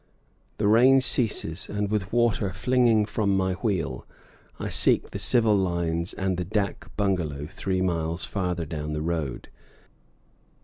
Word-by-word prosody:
The 105 - +1
rain 125 +5 +6
ceases, 105 -9 0
and, 105 0 -2
with 100 -3 -1
water 115 -4 +1
flinging 115 +1 +2
from 100 -2 0
my 95 -1 +1
wheel, 90 - -2 0.6
I - - -3
seek - - +2
the - - -5
civil 115 -3 +3
lines 85 -3 -1
and 95 -2 -1
the 90 - -1
dak 100 +2 -3
bungalow 85 -8 -1
three 95 +3 -2
miles 85 -1 -1
farther 90 -4 -2
down 75 0 -5
the 75 - -3
road. 80 -7 -3
95 Hz, 140 wpm, -25 LUFS, 85-105 Hz, 0.6 s, rain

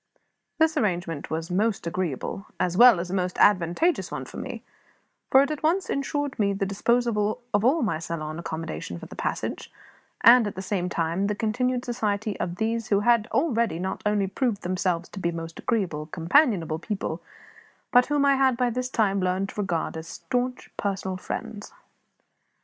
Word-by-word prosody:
This 320 0 +3
arrangement 175 - -1
was 160 +2 -3
a - - -2
most 210 +1 0
agreeable, 175 +3 -3
as 180 -1 0
well 240 -2 +8
as 175 +1 -4
a - - -3
most 180 -1 -1
advantageous 205 - +3
one - - -5
for - - -10
me; - - -6 0.7
for 265 +1 +7
it 280 - -2
at 305 - -4
once 340 +5 +1
insured 275 -1 -2
me 200 -1 +2
the 195 0 -1
disposal 215 +2 +1
of 205 0 +2
all 270 +5 +3
my 200 -8 0
saloon 160 -1 -5
accommodation 160 - -5
for - - -9
the - - -11
passage, - - -3 0.5
and, 235 0 +7
at 205 - -5
the 190 - -5
same 185 -2 -1
time, 170 +3 0
the 210 - -1
continued 245 +4 -1
society 215 -3 -1
of 175 0 -2
those 225 +2 -1
who 200 -1 +2
had 235 0 +3
already 235 - +1
not 190 +2 -3
only 210 -1 +1
proved 205 +2 -1
themselves 180 -1 -1
to 195 - -8
be 170 -2 0
most 165 -1 -7
agreeable, 175 -10 -1
companionable 170 - +2
people, 180 -4 -4 0.7
but 245 0 +5
whom 290 -1 +2
I 275 -1 +4
had 265 -2 +3
by 245 -1 +1
this 250 +2 -2
time 200 -6 +1
learned 185 +2 0
to 210 - -4
regard 170 -6 -2
as 160 0 -6
staunch 250 +4 -3
personal 190 -2 -2
friends. 205 +3 -6
205 Hz, 180 wpm, -26 LUFS, 175-245 Hz, 0.7 s, well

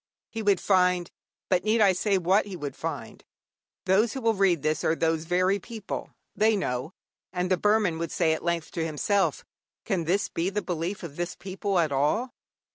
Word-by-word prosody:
He 225 - -4
would 205 -2 +3
find 180 -2 +2 0.4
But 185 -2 +2
need 220 +2 +2
I 200 -3 +5
say 195 +2 +1
what 190 +4 +2
he 195 - -6
would 145 -4 -5
find? - - -6 0.6
Those 200 +5 +3
who 265 - -5
will 225 -1 +3
read 190 -7 +2
this 155 -1 0
are 160 - +2
those 160 0 0
very 185 +3 +2
people 220 0 -6 0.3
they 220 0 +3
know. 130 -5 -2 0.4
And 180 0 -2
the - - +6
Burman 205 -4 +2
would 165 -1 -3
say 165 -3 +2
at 160 - -4
length 170 -1 -1
to 165 - -2
himself, 175 +6 0 0.4
Can 185 -6 -1
this 190 +5 +1
be 170 +3 -1
the 210 +1 -2
belief 175 +3 -3
of 150 -4 -8
this 175 +1 -3
people 195 0 -3
at 160 -4 +2
all? 150 - +1
185 Hz, 195 wpm, -27 LUFS, 165-205 Hz, 0.6 s, the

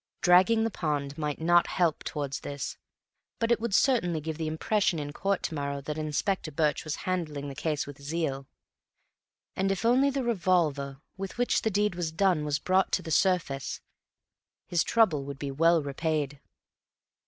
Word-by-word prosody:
Dragging 185 +6 +5
the 225 - 0
pond 145 -5 -2
might 150 -2 -3
not 175 +2 +4
help 170 -4 0
towards 140 -2 -3
this, 140 0 -5 0.6
but 230 0 0
it 235 - +4
would 225 -4 0
certainly 215 - +2
give 155 +1 -5
the 160 - -1
impression 180 +4 +1
in 145 -1 -5
court 195 +3 -1
to - - -2
morrow 140 -1 -3
that 150 +2 -5
Inspector 155 +4 -1
Birch 150 0 +1
was 155 -1 -3
handling 155 -6 -2
the - - -6
case 150 +1 -2
with 140 -1 -11
zeal. 140 -3 -3 1.1
And 195 +1 +1
if 195 +2 -2
only 255 +4 +4
the 275 -1 -1
revolver 170 - +1 0.2
with 195 +2 -6
which 245 0 +2
the 220 - +1
deed 205 -1 +1
was 175 -2 -3
done 175 -2 +2
was 145 -1 0
brought 185 +4 +1
to - - +1
the 160 - -6
surface, 165 - +1 0.9
his 170 -2 +1
trouble 190 -12 +3
would 140 -1 -6
be 140 0 -4
well 165 +3 +3
repaid. 145 0 -2
160 Hz, 175 wpm, -28 LUFS, 145-190 Hz, 1.1 s, Dragging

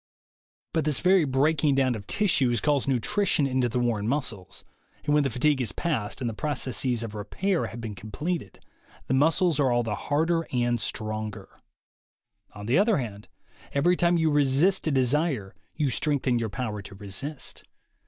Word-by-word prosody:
But 160 - +1
this 150 -2 0
very 185 -2 +4
breaking 145 +2 +2
down 130 -2 +2
of 105 -3 -7
tissues 135 - +2
calls 145 -3 +1
nutrition 150 - +1
into 130 -2 +1
the 120 - -2
worn 115 -4 0
muscles, 115 -8 -3 0.4
and 145 - +2
when 150 - +5
the 140 - 0
fatigue 135 +3 +1
is 110 -7 -1
past, 130 -8 -2
and 125 - -1
the 115 - -2
processes 130 -3 -1
of 110 -2 -6
repair 165 - -1
have 120 - -8
been 115 -2 -5
completed, 110 - -5 0.5
the - - -1
muscles 160 +3 +3
are 135 -3 +3
all 120 0 +2
the 110 -2 -2
harder 165 +6 0
and 120 -2 +1
stronger. 110 -1 -4 1.1
On 105 - -8
the 125 - +3
other 215 +1 +3
hand, 105 -6 -5 0.5
every 170 +6 +3
time 175 -1 +2
you 160 -1 +2
resist 145 +7 +3
a - - +2
desire 135 - +1 0.2
you 150 -4 0
strengthen 130 -2 0
your 115 -1 -2
power 105 -1 -4
to 100 0 -11
resist. 105 +9 -5
130 Hz, 170 wpm, -26 LUFS, 115-155 Hz, 1.1 s, when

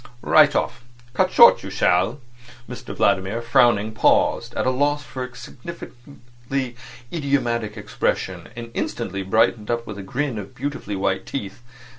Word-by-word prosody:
Right 150 -2 +5
off. 120 -1 -1 0.3
Cut - - +2
short. - - +7
You - - -7
shall—" 90 +10 +1 0.5
Mr 120 -1 -8
Vladimir, 100 +2 +1
frowning, 115 -2 +3
paused, 110 - +2
at - - -1
a 130 - +3
loss 145 +2 0
for 130 -2 -6
a 125 -1 -9
sufficiently 125 -3 -7 0.4
idiomatic 120 -8 -1
expression, 105 - -2
and 115 0 -8
instantly 100 - -3
brightened 105 +2 +1
up, 120 0 -1
with 105 -1 -7
a - - -5
grin 125 +4 -3
of 100 - -9
beautifully 135 -6 -4
white 95 0 -1
teeth. 105 -4 -6
120 Hz, 145 wpm, -22 LUFS, 105-135 Hz, 0.5 s, short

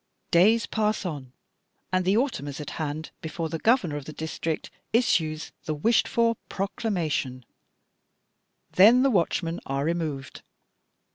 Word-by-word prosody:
'Days 215 +7 +5
pass 215 -2 0
on, 140 -7 -5 0.6
and 185 -1 +2
the 195 +3 +3
autumn 245 - -1
is 145 0 -6
at 150 - -6
hand 155 +1 -4
before 160 0 -4
the 165 - -4
governor 220 - +2
of 145 - -7
the 155 - -8
district 160 0 -4 0.2
issues 160 -10 +1
the 155 - -2
wished 225 +10 +2
for 230 -1 +2
proclamation; 170 - -2 1.3
then 230 +7 +7
the 275 - +4
watchmen 170 -3 0
are 135 +1 -1
removed. 155 -5 -3
165 Hz, 135 wpm, -26 LUFS, 150-215 Hz, 1.3 s, then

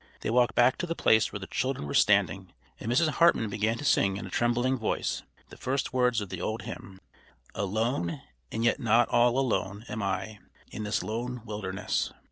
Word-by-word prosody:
They - - -2
walked 125 0 +3
back 120 +1 +4
to 175 - -2
the 165 - -2
place 110 -7 +3
where 100 - -5
the 95 - -7
children 130 - -2
were 70 - -5
standing, - - +2 0.3
and 115 - -3
Mrs. 145 +7 +3
Hartman 150 -9 +3
began 110 +3 0
to 145 - -6
sing 95 -7 +3
in - - -6
a 95 - -9
trembling 120 +4 +1
voice 110 - -1 0.3
the - - -13
first 135 +1 -2
words 125 -3 +2
of 100 - -6
the 90 -2 -5
old 110 +4 -3
hymn: 95 -1 -9 0.5
"Alone, 105 -2 -1 0.3
and 115 - -2
yet 120 - +2
not 115 -1 +3
all 120 +1 +3
alone, 110 -5 -1
am 110 - -4
I 100 +2 -3 0.3
In 110 - -5
this 105 -1 -1
lone 120 +2 -4
wilderness." 100 -3 -2
115 Hz, 195 wpm, -28 LUFS, 100-125 Hz, 0.5 s, back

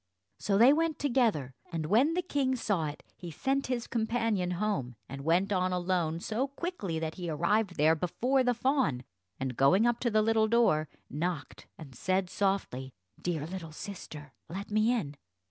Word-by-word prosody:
So 200 -1 +1
they 245 +6 +7
went 325 0 +1
together, 230 - +1 0.2
and 165 -2 -2
when 250 - +3
the 360 - 0
king 275 -6 0
saw 200 -9 0
it 145 - -7
he 175 - -8
sent 270 - -1
his 245 -2 -2
companion 225 -5 0
home, 185 - -1
and 135 0 -7
went 180 +6 +2
on 185 -1 +1
alone 175 -3 0
so 230 +8 -1
quickly 280 - -4
that 160 0 -3
he 175 - -3
arrived 180 +5 +1
there 155 +2 +5
before 245 - +1
the 245 -1 +2
fawn; 250 - +1 0.4
and, 130 -2 -3
going 180 - +4
up 240 -1 +2
to 240 - +1
the 215 -1 +3
little 220 0 +3
door, 215 -10 +3 0.2
knocked 160 0 -4
and 145 -5 -11
said 185 +7 -1
softly, 190 -10 -1 0.3
"Dear 165 -4 -2
little 165 -1 -6
sister, 150 -5 -8 0.2
let 195 +5 -6
me 215 +2 +3
in." 150 -13 -2
195 Hz, 175 wpm, -30 LUFS, 160-235 Hz, 0.4 s, they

